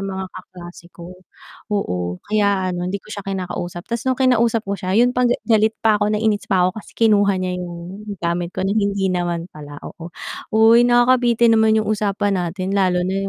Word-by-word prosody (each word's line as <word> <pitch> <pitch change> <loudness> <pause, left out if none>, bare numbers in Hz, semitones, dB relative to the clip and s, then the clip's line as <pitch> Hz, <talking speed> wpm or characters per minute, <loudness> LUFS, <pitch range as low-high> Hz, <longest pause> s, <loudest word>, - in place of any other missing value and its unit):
mga 190 -1 -4
kaklase 175 -1 -12
ko. 175 +1 -11 0.6
Oo, 90 - -2
kaya 200 -3 +1
ano 175 0 -3
hindi 200 - -2
ko - - -21
siya 200 - -5
kinakausap, 180 -2 -5
tas 235 - -2
nung 260 - +1
kinausap 235 -3 +2
ko 200 - -3
siya 185 +1 -2
yun 245 +2 +4
pang 250 -1 +2
ga 240 - +2
galit 220 -1 +2
pa 215 -1 +3
ko, 205 - +2
nainis 215 0 0
pa 185 -4 +3
ko, - - -2
kasi 220 - -11
kinuha 205 -3 +3
niya 180 -1 -3
yung 180 +4 -8 0.2
gamit 170 +1 -2
ko 190 - -1
na 195 - 0
hindi 200 -3 0
naman 175 -1 -2
pala, 145 -1 -10
oo. 170 0 -9 0.5
Uy, 225 +2 +6
nakakabitin 240 -1 +4
naman 220 0 +4
yung 215 - 0
usapan 200 -2 -1
natin 185 +2 -3
lalo 185 -3 +1
na 195 +1 -2
195 Hz, 195 wpm, -20 LUFS, 180-220 Hz, 0.6 s, Uy